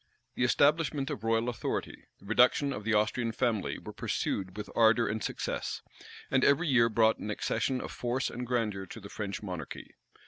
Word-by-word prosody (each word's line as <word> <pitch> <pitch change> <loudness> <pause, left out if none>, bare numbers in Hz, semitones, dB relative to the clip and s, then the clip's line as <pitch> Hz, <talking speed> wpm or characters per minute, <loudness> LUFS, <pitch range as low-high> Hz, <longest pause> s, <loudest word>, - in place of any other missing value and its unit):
The - - -1
establishment 145 +2 +2
of 105 - -5
royal 115 +1 +1
authority, 120 -2 -3
the - - -18
reduction 125 +6 +4
of 105 - -6
the 115 +1 +1
Austrian 110 +2 +1
family, 115 -4 -1
were - - -9
pursued 95 0 -2
with 105 - -5
ardor 115 0 +5
and 110 +1 -2
success; - - -3 0.5
and 130 0 +3
every 140 +5 +4
year 120 -4 +4
brought 110 0 +3
an 105 - -5
accession 130 +4 -1
of - - -6
force 125 +2 -1
and 125 0 -5
grandeur 105 -6 -1
to - - -9
the 100 -1 -10
French 100 0 -5
monarchy. 90 -7 -7
115 Hz, 180 wpm, -30 LUFS, 105-125 Hz, 0.5 s, ardor